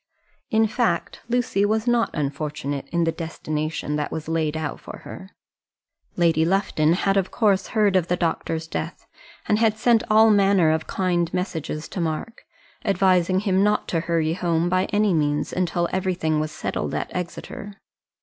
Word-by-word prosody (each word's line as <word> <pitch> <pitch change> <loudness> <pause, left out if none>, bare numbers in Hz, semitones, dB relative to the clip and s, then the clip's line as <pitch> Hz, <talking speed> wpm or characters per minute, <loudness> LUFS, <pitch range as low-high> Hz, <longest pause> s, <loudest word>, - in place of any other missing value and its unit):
In 220 0 +3
fact, 215 -6 -1
Lucy 235 -5 +1
was 215 +2 +1
not 240 -1 +2
unfortunate 145 -1 -3
in 170 0 +1
the 165 - +1
destination 155 -2 -3
that 150 - -3
was 160 -1 -5
laid 160 -1 0
out 155 -2 -4
for - - -10
her. 190 - -9 0.9
Lady 165 -2 +3
Lufton 170 -3 +2
had 195 +2 +1
of 190 -1 +1
course 205 -4 +2
heard 205 -3 +4
of 180 -3 +2
the 180 - +1
doctor's 165 -1 -2
death, 160 - -5 0.4
and 210 - +2
had 220 -1 +2
sent 230 0 +4
all 220 +1 +6
manner 195 -5 +4
of 160 0 -1
kind 175 -3 0
messages 160 -4 -3
to 185 - -4
Mark, 165 +9 -3 0.4
advising 185 -2 +2
him 195 -2 +2
not 210 0 +1
to 165 - +1
hurry 165 -1 0
home 170 -1 0
by 185 +1 +2
any 210 -2 +1
means 150 -2 0
until 175 -1 0
everything 180 -4 0
was 155 0 -2
settled - - -3
at - - -4
Exeter. 200 +4 -6
180 Hz, 165 wpm, -23 LUFS, 160-200 Hz, 0.9 s, all